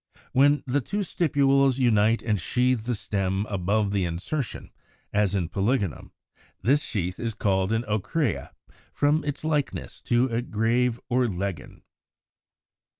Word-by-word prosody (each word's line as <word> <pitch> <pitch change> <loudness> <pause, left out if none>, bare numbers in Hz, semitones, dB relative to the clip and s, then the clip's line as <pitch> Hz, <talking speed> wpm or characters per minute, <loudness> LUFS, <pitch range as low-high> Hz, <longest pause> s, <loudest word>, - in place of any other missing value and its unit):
When 145 +2 +4
the 140 +2 0
two 205 - -3
stipules 140 -7 +2
unite 115 -3 +3
and 105 -5 0
sheathe 125 +3 +1
the 120 0 0
stem 95 -1 -1
above 100 +1 0
the 100 -2 +1
insertion, 95 - -4 0.4
as 105 -1 +2
in 90 -4 0
Polygonum 100 - -1
(Fig. - - -35
178), 120 - +3
this 145 +1 +4
sheath 90 - -3
is 115 -2 -3
called 95 -2 +1
an 115 +1 +1
Ocrea 110 - -1 0.5
from 150 +2 +2
its 145 0 -4
likeness 150 -3 -2
to 120 +1 +3
a 115 0 -1
greave 120 +1 0
or 125 0 +2
leggin. 95 -5 -5
115 Hz, 145 wpm, -26 LUFS, 100-135 Hz, 0.5 s, When